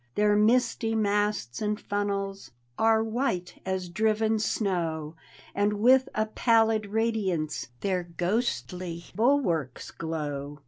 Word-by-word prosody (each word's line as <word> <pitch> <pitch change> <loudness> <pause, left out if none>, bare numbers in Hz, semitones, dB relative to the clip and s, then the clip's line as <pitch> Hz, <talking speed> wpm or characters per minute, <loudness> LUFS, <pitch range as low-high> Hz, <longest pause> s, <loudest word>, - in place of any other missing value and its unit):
Their 210 0 +3
misty 225 +1 +2
masts 205 - 0
and 210 0 -1
funnels 200 -1 -3 0.3
Are 220 - +3
white 220 -6 -2
as 190 -1 -2
driven 220 +4 +1
aiow. 170 -8 -1 0.4
And 205 +1 +1
with 250 +5 +4
a 215 - +1
pallid 225 -1 +2
radiance 200 -8 -1
Their 185 -3 -1
ghostly 175 - -2
bulwarks 205 - +1
glow. 145 -3 -4
205 Hz, 105 wpm, -27 LUFS, 175-220 Hz, 0.4 s, with